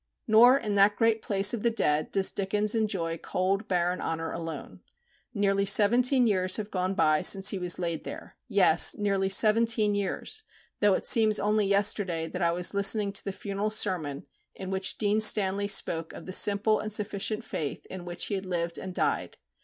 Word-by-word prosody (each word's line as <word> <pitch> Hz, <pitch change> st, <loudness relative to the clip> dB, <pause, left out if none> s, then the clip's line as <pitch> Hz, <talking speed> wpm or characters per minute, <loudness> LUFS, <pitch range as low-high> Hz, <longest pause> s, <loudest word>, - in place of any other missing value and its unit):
Nor 240 Hz, +5 st, +5 dB
in 210 Hz, -6 st, -4 dB
that 200 Hz, +1 st, +3 dB
great 225 Hz, -1 st, 0 dB
place 200 Hz, 0 st, +2 dB
of 235 Hz, -, -4 dB
the 235 Hz, -, +1 dB
dead 155 Hz, -9 st, -1 dB
does 195 Hz, -1 st, +1 dB
Dickens 205 Hz, +2 st, -2 dB
enjoy 190 Hz, -7 st, -2 dB
cold 195 Hz, +3 st, -3 dB
barren 180 Hz, 0 st, -1 dB
honour 165 Hz, 0 st, -4 dB
alone. 165 Hz, -1 st, -8 dB, 0.5 s
Nearly 200 Hz, -3 st, 0 dB
seventeen 240 Hz, +6 st, +3 dB
years 185 Hz, -4 st, +1 dB
have 215 Hz, -1 st, -7 dB
gone 185 Hz, 0 st, -3 dB
by 155 Hz, -5 st, +1 dB
since 195 Hz, 0 st, +4 dB
he 195 Hz, -, -4 dB
was 180 Hz, -1 st, 0 dB
laid 170 Hz, -3 st, -4 dB
there -, -, -10 dB
yes, 190 Hz, -7 st, +3 dB
nearly 195 Hz, -2 st, -1 dB
seventeen 215 Hz, +1 st, +2 dB
years, 205 Hz, -, -3 dB, 0.4 s
though 205 Hz, -2 st, +3 dB
it -, -, -5 dB
seems 215 Hz, -2 st, +4 dB
only 210 Hz, 0 st, 0 dB
yesterday 195 Hz, -4 st, 0 dB
that 180 Hz, -, -7 dB
I 170 Hz, -1 st, +1 dB
was 175 Hz, +3 st, 0 dB
listening 200 Hz, 0 st, +2 dB
to 195 Hz, -, -1 dB
the 195 Hz, -, -5 dB
funeral 200 Hz, +2 st, -4 dB
sermon 180 Hz, -10 st, -2 dB, 0.3 s
in 190 Hz, 0 st, -8 dB
which 190 Hz, 0 st, -2 dB
Dean 210 Hz, 0 st, 0 dB
Stanley 200 Hz, -2 st, +4 dB
spoke 165 Hz, -5 st, 0 dB
of -, -, -11 dB
the 185 Hz, -, -6 dB
simple 210 Hz, +2 st, +2 dB
and 215 Hz, -, -5 dB
sufficient 210 Hz, 0 st, -2 dB
faith 145 Hz, -3 st, -6 dB
in 185 Hz, -1 st, -9 dB
which 175 Hz, 0 st, -3 dB
he -, -, -5 dB
had 190 Hz, -1 st, -5 dB
lived 170 Hz, -2 st, -3 dB
and 185 Hz, -1 st, -8 dB
died. -, -, -2 dB
200 Hz, 185 wpm, -26 LUFS, 185-210 Hz, 0.5 s, Nor